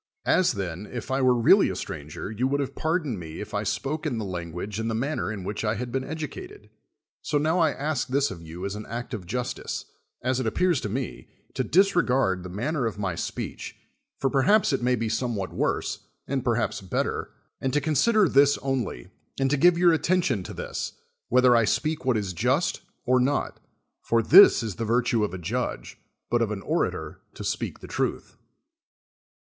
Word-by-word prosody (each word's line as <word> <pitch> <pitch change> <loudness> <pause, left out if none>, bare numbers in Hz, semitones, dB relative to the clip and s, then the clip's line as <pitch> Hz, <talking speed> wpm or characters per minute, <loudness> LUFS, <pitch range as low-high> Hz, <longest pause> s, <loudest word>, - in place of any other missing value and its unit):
As, 185 -7 +3
then, 95 -1 -4
if 120 0 -6
I 135 +1 +1
were 130 -1 +4
really 115 - +5
a - - -3
stranger, 75 +6 -6
you 120 +4 0
would 140 +1 0
have 140 -1 -2
pardoned 155 - -1
me 80 -2 -8
if - - -7
I - - 0
spoke 155 +3 -2
in 125 -6 -2
the 110 - -3
language 90 +3 -5
and 110 0 -1
the 110 - -1
manner 135 -1 -1
in 100 -4 -5
which 105 +4 -4
I 110 0 +1
had 120 +2 -4
been 130 +1 -1
educated, 365 - -7 0.5
so 150 - 0
noAV 160 +4 +1
I 160 -2 +4
ask 145 -2 -2
this 140 +2 +1
of 85 - -8
you 85 +3 -7
as 100 - -3
an 105 - -7
act 120 +2 -5
of 95 -6 -5
justice, 125 +5 -3 0.4
as 130 +1 +1
it 125 - -1
appears 175 +5 +2
to 105 - -3
me, 130 +4 -4 0.3
to - - -1
disregard 135 - +3
the 90 - -8
manner 125 - -1
of 110 - -5
my 100 -3 -2
speech, - - -5 0.4
for 135 - 0
perhaps 150 +7 +4
it 135 - 0
may 125 +1 +2
be 115 -1 -2
somewhat 110 -4 -2
worse, - - -1 0.3
and 135 -2 -1
perhaps 120 -4 0
better, 95 - -2 0.3
and 135 - 0
to 150 - +2
consider 180 - +3
this 140 0 +5
only, 130 - -3 0.3
and 135 0 +1
to - - +4
give 175 +4 +5
your 175 -1 +5
attention 160 - +1
to 90 - -8
this, - - -4 0.4
whether 125 0 +5
I 115 -1 +4
speak 155 +5 -1
what 130 -3 +3
is 100 -3 -3
just 130 - +1 0.2
or 130 0 +4
not; 135 +3 0 0.4
for 115 -1 +1
this 180 - +8
is 105 -4 -4
the 115 - -2
virtue 120 +2 +1
66 105 - +2
of - - -12
a - - -13
judge, - - -3 0.3
but 120 0 +3
of 115 - +1
au 105 - -3
orator - - -2
to - - -7
speak - - -3
the - - -9
truth. - - -2
125 Hz, 200 wpm, -26 LUFS, 105-145 Hz, 0.5 s, this